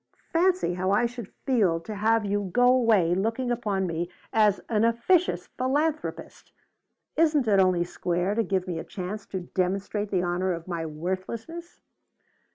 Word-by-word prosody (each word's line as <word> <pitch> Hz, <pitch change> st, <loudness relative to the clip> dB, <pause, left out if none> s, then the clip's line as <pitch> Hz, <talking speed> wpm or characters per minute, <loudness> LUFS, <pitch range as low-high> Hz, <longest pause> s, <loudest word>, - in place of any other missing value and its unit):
Fancy 360 Hz, -, +2 dB
how 185 Hz, +1 st, -1 dB
I 205 Hz, +5 st, +3 dB
should 235 Hz, -3 st, -6 dB
feel 210 Hz, -11 st, +2 dB
to 215 Hz, -, -7 dB
have 220 Hz, +1 st, +2 dB
you 200 Hz, -1 st, -1 dB
go 245 Hz, +4 st, +3 dB
away 225 Hz, -9 st, +4 dB
looking 225 Hz, +6 st, -1 dB
upon 205 Hz, -5 st, -1 dB
me 170 Hz, 0 st, -3 dB, 0.2 s
as 210 Hz, -2 st, +4 dB
an 220 Hz, -2 st, +1 dB
officious 235 Hz, +11 st, +2 dB
philanthropist! 295 Hz, +4 st, -2 dB, 0.6 s
Isn't 305 Hz, -6 st, +3 dB
it 200 Hz, -2 st, +4 dB
only 185 Hz, -2 st, +3 dB
square 175 Hz, +2 st, -1 dB
to 230 Hz, -, +1 dB
give 190 Hz, -4 st, -1 dB
me 170 Hz, -2 st, -3 dB
a -, -, -5 dB
chance 200 Hz, +3 st, -6 dB
to 190 Hz, -, -4 dB
demonstrate 195 Hz, +3 st, -2 dB
the 185 Hz, -3 st, 0 dB
honor 180 Hz, +1 st, 0 dB
of 170 Hz, 0 st, -7 dB
my 170 Hz, -2 st, -3 dB
worthlessness?" 190 Hz, -, -5 dB
205 Hz, 160 wpm, -26 LUFS, 180-240 Hz, 0.6 s, away